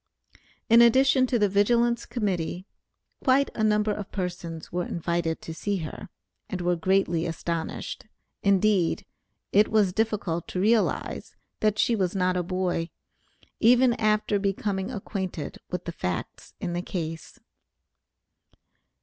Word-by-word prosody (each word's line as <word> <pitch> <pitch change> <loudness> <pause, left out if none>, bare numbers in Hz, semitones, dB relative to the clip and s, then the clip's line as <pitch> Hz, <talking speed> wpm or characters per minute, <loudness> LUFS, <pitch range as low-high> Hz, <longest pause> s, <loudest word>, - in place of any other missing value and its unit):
In 230 +1 +7
addition 260 +2 +5
to 245 - +1
the 210 -2 +3
Vigilance 235 +4 +2
Committee, 185 -6 -2 0.6
quite 275 +1 +3
a 220 - -2
number 210 0 +2
of 205 -1 -5
persons 175 -3 -5
were 180 0 -1
invited 170 -1 -2
to 165 - -6
see 200 +5 -2
her, 190 +5 -8 0.4
and 185 - -3
were 175 0 +1
greatly 175 -1 +1
astonished. 165 +4 -4 0.3
Indeed 200 -2 +2 0.5
it 210 +1 +5
was 210 -4 +2
difficult 200 -6 -1
to 180 - -4
realize, 220 +3 0 0.2
that 215 -1 +1
she 235 - +3
was 190 -3 -1
not 185 -1 +1
a 180 - +1
boy, 180 -1 -1 0.7
even 245 +2 +5
after 215 -1 +2
becoming 195 0 -1
acquainted 190 - -5
with 180 -1 -4
the 170 - -3
facts 90 - -5
in 175 - -3
the 175 - -1
case. 165 -3 -6
195 Hz, 130 wpm, -26 LUFS, 175-215 Hz, 0.7 s, In